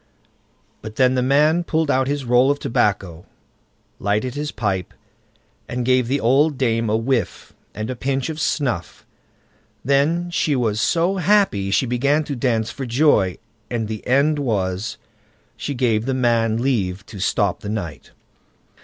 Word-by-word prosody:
But 110 0 -8
then 130 +1 +3
the 130 - +1
man 150 +6 +3
pulled 160 -3 0
out 130 -1 +1
his 140 -1 -2
roll 125 +2 +4
of 145 - +2
tobacco, 100 - -1 0.7
lighted 105 +5 -1
his 150 +1 -4
pipe, 100 -5 -3 0.7
and 125 0 -3
gave 130 -1 +2
the 140 +3 0
old 140 +5 +3
dame 115 -3 0
a 110 - +2
whiff, 115 -2 -2 0.2
and 110 +2 -4
a 130 - -4
pinch 135 +2 -2
of 160 -1 -5
snuff. 125 - -2 0.8
Then 155 +6 +1
she 155 -3 +1
was 115 -4 0
so 175 +7 +1
happy 185 - +2
she 100 - +2
began 140 +5 +1
to 145 -1 -4
dance 115 -3 0
for 135 -3 -6
joy, 120 - +2 0.3
and 115 -3 -2
the 110 -1 -6
end 140 +4 +3
was, 100 -5 -2 0.6
she 140 - -4
gave 115 -2 0
the 135 - 0
man 115 -3 +1
leave 100 -8 -1
to 100 -1 -10
stop 100 0 0
the 105 - -7
night. 95 -9 -5
125 Hz, 155 wpm, -21 LUFS, 110-140 Hz, 0.8 s, roll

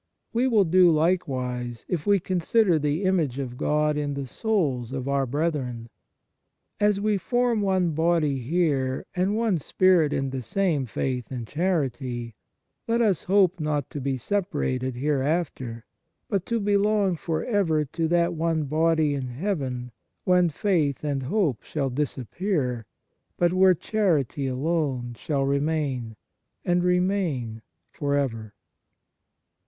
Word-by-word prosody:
We 240 +3 +2
will 220 -5 +4
do 180 +1 +5
likewise 130 -8 -1
if 170 -2 -3
we 200 -1 +5
consider 185 0 +2
the 150 +5 -1
image 170 -9 +1
of 130 -3 -4
God 150 +3 +1
in 145 -1 -2
the 140 -1 -3
souls 140 - -1
of 130 -1 -4
our 140 -1 +1
brethren. 130 -5 -2 0.9
As 205 -1 +3
we 210 -1 +1
form 240 +2 +1
one 190 -3 +1
body 160 -3 +1
here 135 -2 0
and 185 +3 +1
one 220 -7 +1
spirit 175 -1 +3
in 135 -2 -1
the 130 -1 -3
same 150 - 0
faith 125 +1 -3
and 125 -3 -5
charity, 130 -7 -2 0.5
let 230 +1 +1
us 210 -7 +2
hope 190 -2 +3
not 150 -3 -2
to 145 - -5
be 135 0 -1
separated 130 - -1
hereafter, 135 -3 -1 0.4
but 195 -3 -2
to 235 -1 0
belong 205 -2 +2
for 160 0 -3
ever 170 -9 +1
to 160 +4 -2
that 170 +1 +2
one 165 -1 0
body 155 +1 +2
in 135 -2 -3
heaven 130 -4 -3 0.3
when 180 -2 +4
faith 155 -5 0
and 140 -2 -1
hope 145 - 0
shall 140 -4 -3
disappear, 130 - -2 0.5
but 175 0 +2
where 185 0 +5
charity 155 - 0
alone 130 -3 -1
shall 140 +2 -1
remain, 140 -5 -1 0.5
and 175 0 +2
remain 180 - 0 0.3
for 145 -1 -1
ever. 115 -7 -2
155 Hz, 135 wpm, -25 LUFS, 130-185 Hz, 0.9 s, do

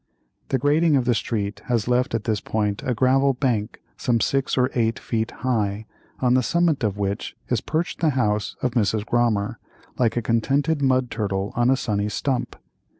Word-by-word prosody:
The 130 - +2
grading 150 +4 +3
of 130 -3 +2
the 120 - +3
street 105 -1 -2
has 120 -3 0
left 125 -1 +1
at 110 - -2
this 110 -2 -1
point 105 -2 -1
a 125 - -1
gravel 135 +2 +3
bank 120 -5 -1
some 120 -2 +1
six 135 +3 0
or 125 0 +2
eight 115 -2 +1
feet 115 -1 -2
high, 110 -4 -1 0.4
on 125 -1 +3
the 130 - +4
summit 160 +2 +1
of 105 -2 0
which 100 0 -3
is - - +1
perched 160 +2 -2
the 165 - +3
house 105 -7 0
of 125 - +1
Mrs. 110 -2 0
Grommer, 115 -2 +1 0.4
like 120 -2 +2
a 120 - 0
contented 140 +7 +1
mud 130 -2 +2
turtle 100 -3 -2
on 120 +1 +2
a 135 - +4
sunny 105 -3 -1
stump. 130 +4 -2
120 Hz, 185 wpm, -23 LUFS, 105-130 Hz, 0.4 s, the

